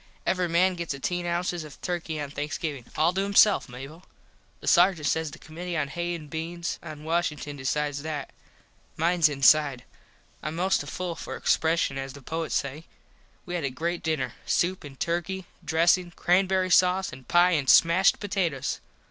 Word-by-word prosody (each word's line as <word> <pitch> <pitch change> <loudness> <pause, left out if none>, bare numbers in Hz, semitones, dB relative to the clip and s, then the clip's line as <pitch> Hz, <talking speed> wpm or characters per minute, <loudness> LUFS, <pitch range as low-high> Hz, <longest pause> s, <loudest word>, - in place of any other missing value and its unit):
Every 180 -1 +1
man 180 +3 +3
gets 170 -5 -4
ateen 175 +6 -2
ounces 175 0 -1
of 150 -2 -12
Turky 170 -3 -3
on 145 -1 -5
Thanksgivin. 145 -2 -4
All 160 +3 +3
to 190 - 0
himself, 200 -2 +4
Mable. 135 +7 -9 0.6
The - - -10
sargent 175 -3 +4
says 160 +1 0
the - - -11
commitee 170 +1 -5
on 140 -2 -1
Hays 175 +3 -3
and 150 - -12
Beans 165 +3 -4
at 155 -2 -8
Washington 150 -2 -2
decides 145 +1 -2
that. 150 -2 -5 0.7
Mines 170 0 +3
inside. 140 -2 +4 0.6
Im 155 +2 -3
most 185 +3 +2
to 145 - -6
full 180 +2 -4
for - - -7
expreshun 160 -4 +1
as 135 0 -5
the 140 - -11
poets 160 +3 -3
say. 145 +4 -3 0.6
We 175 - -6
had 175 -2 -2
a 140 - 0
great 170 +7 -3
dinner. 140 -7 -1
Soup 180 +2 +1
an 140 -2 -10
turky, 175 +6 -2 0.2
dressin, 175 +2 +2
crambury 185 +1 +2
sause 185 -1 +3
an 130 0 -11
pie 175 +1 +4
an 145 -6 0
smashed 170 +7 +5
potatoes. 180 -9 -1
165 Hz, 170 wpm, -26 LUFS, 145-175 Hz, 0.7 s, smashed